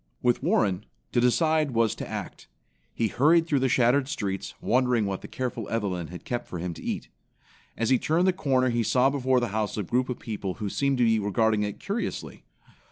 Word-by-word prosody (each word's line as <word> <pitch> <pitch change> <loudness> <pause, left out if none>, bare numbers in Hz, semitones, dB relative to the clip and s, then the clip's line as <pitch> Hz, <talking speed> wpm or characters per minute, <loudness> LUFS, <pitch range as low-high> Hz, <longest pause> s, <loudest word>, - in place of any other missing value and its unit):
With 120 -1 +2
Warren, 100 0 +1 0.2
to 120 - +2
decide 155 +2 +2
was 115 -2 +3
to - - -6
act. - - -6 0.4
He 115 - 0
hurried 160 +8 +4
through 145 -4 +1
the 130 0 +1
shattered 130 +3 +3
streets, 100 -8 -4
wondering 125 -2 +2
what 95 -1 -3
the - - -8
careful 120 -4 -4
Evelyn 95 -7 -2
had 90 +1 -10
kept 120 -1 -3
for 90 - -6
him 85 +1 -3
to - - -11
eat. - - -4 0.7
As 115 +2 0
he 130 - +5
turned 165 +4 +2
the 185 - +4
corner 130 -7 +1
he 120 0 +1
saw 125 +4 +3
before 130 -2 +2
the 120 -2 -1
house 105 +1 -2
a 105 - -1
group 125 +8 0
of 125 - -2
people 100 -5 -5
who 105 -2 -4
seemed 140 +5 0
to 125 - +3
be 115 -1 +3
regarding 105 +1 +1
it 105 -1 -3
curiously. 210 +4 -4
120 Hz, 210 wpm, -26 LUFS, 105-130 Hz, 0.7 s, he